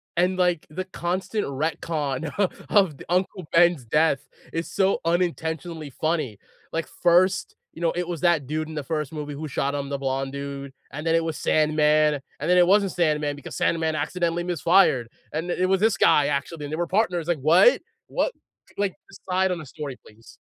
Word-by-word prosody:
And, 180 +2 +2
like, 180 -3 +1
the 185 +4 -5
constant 185 +3 -2
retcon 150 0 -2
o 200 -3 +3 0.2
of 190 -9 +3
d - - -11
Uncle 185 -1 -1
Ben's 170 -5 +4
death 150 +2 +2 0.3
is 165 +1 -2
so 195 0 +2
unintentionally 165 -2 -1
funny, 155 -7 -2 0.3
like 165 0 -2
1st, 185 +2 +3 0.2
you 165 - -11
know, 165 -1 +2
it 175 0 -2
was 170 -4 -4
that 170 -5 +3
dude 155 +3 -3
in 155 - -7
the 150 - -3
1st 150 -1 -3
movie 150 -2 -5
who 155 +2 -5
shot 140 0 -1
him, 140 -1 -3
the 140 - -2
blonde 135 0 -2
dude, 140 -1 -6 0.2
and 150 +3 -5
then, 165 - +3
it 165 - +2
was 160 -2 -3
Sandman, 150 -1 +3 0.2
and 150 - -3
then, 180 - +5
it 175 - +5
wasn't 200 0 +4
Sandman 150 -4 0
because 145 - -9
Sandman 160 -1 +1
accidentally 170 +3 -1
misfired, 175 -7 +3 0.3
and 165 +3 -3
the - - -2
it 185 - +3
was 190 - +3
this 220 0 +3
guy 145 -1 +5
actually, 145 +2 -2
and 145 - -7
they 155 - -1
were 175 - 0
partners, 180 -4 0
like,"What? 165 - +5 0.3
What?" - - -1 0.4
Like, 200 -2 0
decide 190 -1 -1
on 180 - -1
the 155 - -8
story, 140 -1 -7
please. 110 +2 -17
160 Hz, 195 wpm, -24 LUFS, 145-180 Hz, 0.4 s, then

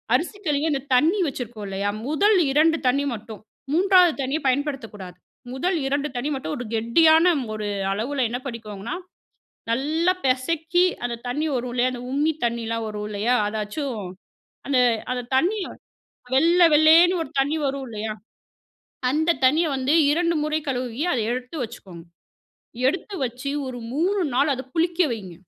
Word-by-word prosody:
அரிசி 360 +5 -2
கழுவி 295 +1 +1
அந்த 275 -2 -1
தண்ணி 325 +11 +3
வச்சுருக்கோம் 240 -6 -6
இல்லயா? 195 +1 -2 0.2
முதல் 395 +8 +3 0.2
2 325 +1 +4
தண்ணி 280 +3 +2
மட்டும். 220 -1 -9 0.3
3வது 365 -1 +5
தண்ணிய 270 +4 -1
பயன்படுத்தக்கூடாது. 250 - -3 0.4
முதல் 350 +7 0 0.2
2 290 +1 0
தண்ணி 245 +5 -2
மட்டும் 210 -13 -4
ஒரு 245 - -5
கெட்டியான 315 +9 +4 0.3
ஒரு 210 -1 -4 0.3
அளவுல 255 +6 -1
என்ன 245 +2 -3
பண்ணிக்கோங்கன்னா, 220 -3 -6 0.8
நல்லா 315 +8 +1
பெசக்கி 320 +7 +1 0.2
அந்த 240 -1 -2
தண்ணி 295 +6 -1
வரும் 245 0 -3
இல்லயா 250 +1 +1
அந்த 245 - -6
உம்மி 295 +4 +2
தண்ணியலாம் 230 -1 -2
வரும் 210 0 -5
இல்லயா? 215 +4 +1
அதாச்சும். 220 +3 -4 0.7
அந்த 275 -2 +2 0.3
அந்த 250 0 -1 0.2
தண்ணி 365 +11 +2 0.8
வெள்ள 335 +6 +4 0.2
வெள்ளேன்னு 325 +4 +6
ஒரு - - -8
தண்ணி 290 +4 0
வரும் 275 0 -3
இல்லயா? 220 -1 -4 1.0
அந்த 315 +4 +2
தண்ணிய 310 +6 +4
வந்து 265 +3 +1 0.3
2 335 -1 +1
முறை 305 +1 0
கழுவி 250 0 -3
அத 250 - 0
எடுத்து 250 +5 -5
வச்சுக்கோங்க. 190 -7 -11 0.8
எடுத்து 375 +6 -2
வெச்சு 255 +3 -4 0.2
ஒரு 255 -1 -6 0.2
3 375 +6 +1
நாள் 285 +3 +3
அத 260 +1 -7
புளிக்க 340 +1 +1
வையுங்க. 190 -6 -8
265 Hz, 145 wpm, -23 LUFS, 235-320 Hz, 1.0 s, வெள்ளேன்னு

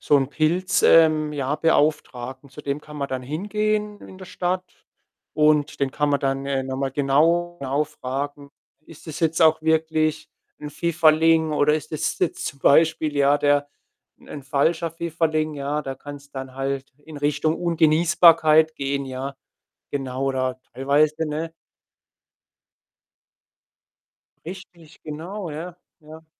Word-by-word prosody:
so 145 - +3
'n 135 -1 +1
Pilz 170 +5 0
ähm, 155 -2 +5
ja, 140 0 -2
Beauftragten. 140 -4 0
Zu 150 +2 -11
dem 140 +1 -3
kann 150 0 -12
man 140 -1 -3
dann 130 -1 -4
hingehen 210 +7 -2
in 185 - -13
der 185 - -9
Stadt 180 +1 -2 0.7
und 150 -2 +2
den 135 -1 +1
kann 150 +1 -1
man 140 - +1
dann, 135 0 -1
äh, 135 -1 -1
noch 130 0 -5
mal 135 0 -2
genau 165 +6 +1
genau 140 +3 0
fragen: 140 0 -6 0.4
„Ist 165 +1 -15
das 155 - -7
jetzt 165 0 +1
auch 160 0 +5
wirklich 160 -1 0 0.3
'n 150 0 -7
Pfifferling 160 -1 +3
oder 150 0 +3
ist 155 0 -5
das 155 - -2
jetzt 180 - -1
zum 140 - -6
Beispiel, 160 0 +3
ja, 140 +1 +4
der 145 0 +2 0.5
'n 145 - -10
falscher 160 +4 0
Pfifferling?“ 160 -2 -1
Ja, 145 +2 -3
da 135 -1 -5
kann's 145 +1 -11
dann 130 -1 -8
halt 135 0 -4
in 155 -2 -10
Richtung 145 +2 0
Ungenießbarkeit 160 -1 +4
gehen, 140 0 -2
ja, 130 +1 -6 0.6
genau 135 -1 -3
oder 130 -1 -1
teilweise 150 +4 +1
ne? 160 +2 -4 2.9
Richtig, 175 -3 -12
genau, 170 +5 -6
ja, 170 +4 -7 0.2
ja. 160 +1 -13
150 Hz, 140 wpm, -23 LUFS, 140-160 Hz, 2.9 s, ähm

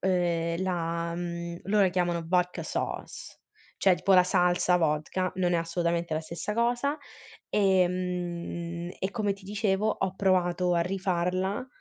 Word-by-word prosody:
ehm, 175 -2 0
la 170 -2 -2
mhmm, 170 0 -4
loro 205 +1 +3
la 190 - +4
chiamano 175 -2 0
"Vodka 180 0 +1
Sauce", - - -5 0.4
cioè, 190 -2 +5
tipo, 195 +4 +2
la 180 -1 +7
salsa 180 0 +3
vodka, 165 +3 0
non 180 -1 +1
è - - +4
assolutamente 170 0 -1
la 155 - 0
stessa 170 +5 -5
cosa, 245 +5 +1 0.5
e 190 -3 +3
mhmm, 175 -1 -4
e 190 - -2
come 205 -1 0
ti 195 0 -13
dicevo, 205 0 0
ho 190 -3 -1
provato 180 -2 +2
a 170 - +2
rifarla, 185 +3 -1
180 Hz, 145 wpm, -28 LUFS, 170-190 Hz, 0.5 s, la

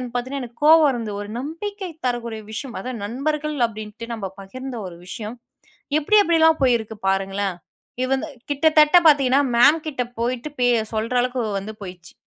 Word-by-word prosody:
பாத்தீங்கன்னா 260 +3 -2
எனக்கு 235 -1 -11
கோவம் 320 0 +7
வருந்து, 230 -5 -3
ஒரு 205 - -7
நம்பிக்கை 370 +7 -5 0.2
தரக்கூடிய 235 -2 -3
விஷயம். 240 +3 -6
அதாவது, 250 -2 -5
நண்பர்கள் 300 +6 -2
அப்டின்ட்டு 215 +1 -8
நம்ம 220 -4 -5 0.2
பகிர்ந்த 255 +6 -7
ஒரு 170 -2 -10
விஷயம், 215 +4 -6 0.6
எப்டி 420 +8 +4
எப்டில்லாம் 320 -2 +4
போயிருக்கு 225 -4 +1
பாருங்களேன்! 195 0 -1 0.5
இவங்க 265 +1 0 0.2
கிட்டத்தட்ட 305 +2 +5
பாத்தீங்கன்னா 275 -2 +4 0.2
மேம் 290 +6 +5
கிட்ட 270 -4 -2 0.2
போயிட்டு 245 +4 -2
பே 245 - +4 0.3
சொல்ற 225 +3 -2
அளவுக்கு 250 0 -1 0.2
வந்து 210 +3 -7
போயிருச்சு. 180 -3 -10
250 Hz, 145 wpm, -22 LUFS, 220-295 Hz, 0.6 s, கோவம்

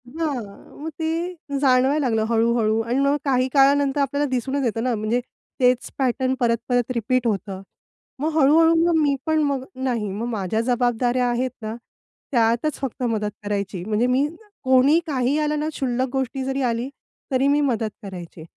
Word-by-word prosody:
हां, 265 -9 -5
मग 320 - -4
ते 320 0 -1 0.5
जाणवायला 265 +2 +3
लागलं 225 -2 +1
हळू-हळू 225 -1 +2
आणि 235 +4 -1
मग 280 +1 +3
काही 255 -2 +2
काळानंतर 280 0 +4
आपल्याला 285 +1 0
दिसूनच 265 +2 -1
येतं 225 -1 -1
ना, 250 -1 +1
म्हणजे 215 +3 0 0.4
तेच 250 -1 +2
पॅटर्न 260 0 +1
परत-परत 245 +1 0
रिपीट 245 +2 0
होतं. 195 -3 -3 0.6
मग 305 +3 0
हळू-हळू 320 +3 +5
मग 345 -1 +2
मी 285 -2 +2
पण 315 -1 +2
मग 280 -3 -1
नाही, 245 -5 -2
मग 210 +4 -4
माझ्या 220 -1 -1
जबाबदाऱ्या 245 0 +1
आहेत 245 +1 -1
ना, 220 0 -4 0.6
त्यातच 235 +4 +2
फक्त 265 -2 -4
मदत 215 -3 -1
करायची. 200 -3 -3
म्हणजे 220 +3 +1
मी 260 +3 +2 0.4
कोणी 260 +4 +5
काही 265 -1 0
आलं 300 0 0
ना, 305 +1 -1
क्षुल्लक 260 -3 -1
गोष्ट 265 0 -2
जरी 270 +1 -2
आली 235 +3 -3 0.4
तरी 265 +1 +2
मी 290 +1 +3
मदत 225 -2 -1
करायची. 180 -4 -9
255 Hz, 160 wpm, -22 LUFS, 230-275 Hz, 0.6 s, हळू-हळू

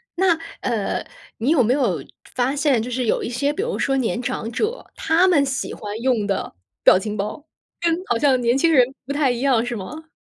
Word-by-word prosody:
那， 350 -2 +3 0.2
呃， 225 -5 -1 0.3
你 235 +5 -1
有 305 -5 +4
没 235 +3 +2
有， 210 - 0
就 - - -23 0.3
发 255 +3 +1
现 280 -5 +2
就 245 - -5
是 250 0 -1
有 - - +1
一 - - -3
些 280 +4 0
比 390 - -3
如 480 - -3
说 270 0 +1
年 245 -1 -1
长 235 -2 -3
者， 440 - -2
他 330 +4 +3
们 315 -7 +4
喜 270 0 -3
欢 210 +1 -6
用 240 -5 +1
的 200 - -2 0.3
表 - - +7
情 210 +2 -4
包， 210 +9 -4 0.4
跟 340 - +2 0.2
好 240 - +1
像 265 -1 +3
年 240 0 +2
轻 330 +5 +3
人 260 -6 +6 0.2
不 280 - -3
太 285 -3 +2
一 240 - -3
样 250 -3 +2
是 240 - -3
吗？ 305 +11 -8
255 Hz, 240 characters per minute, -22 LUFS, 230-295 Hz, 0.4 s, 表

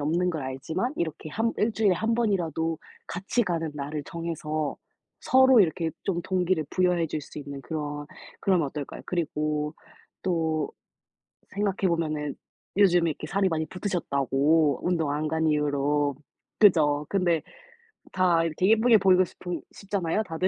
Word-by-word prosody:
없는 170 +5 +1
걸 155 -4 -4
알지만 160 - -3
이렇게 160 -2 -3
한 225 +8 0
1 220 +2 +2
주일에 210 -4 +3
1 225 +5 0
번이라도 165 -8 0 0.3
같이 190 +8 -1
가는 165 -4 -2
날을 145 +1 -4
정해서 155 -3 -3 0.4
서로 260 -2 +6
이렇게 165 -2 +1
좀 175 -3 0
동기를 180 -3 0
부여해 180 -2 +2
줄 155 - -3
수 150 - -10
있는 140 -1 -7
그런 145 0 -4 0.3
그러면 180 -6 +2
어떨까요? 145 0 -7
그리고 150 -2 -1 0.5
또 160 -4 0 0.8
생각해 200 -1 0
보면은 155 -4 -1 0.4
요즘에 175 -4 +4
이렇게 150 - -7
살이 195 +2 +1
많이 160 -3 -1
붙으셨다고, 155 - +1
운동 165 -5 +1
안 150 +1 -1
간 160 0 +1
이후로. 145 -1 +1 0.4
그죠? 150 -8 +5
근데 175 -5 +2 0.7
다 180 -3 +3
이렇게 165 +4 +1
예쁘게 225 +1 +6
보이고 185 -2 +5
싶은 180 0 -6
싶잖아요, 200 0 -2
다들. 180 -1 -1
165 Hz, 310 characters per minute, -26 LUFS, 150-185 Hz, 0.8 s, 서로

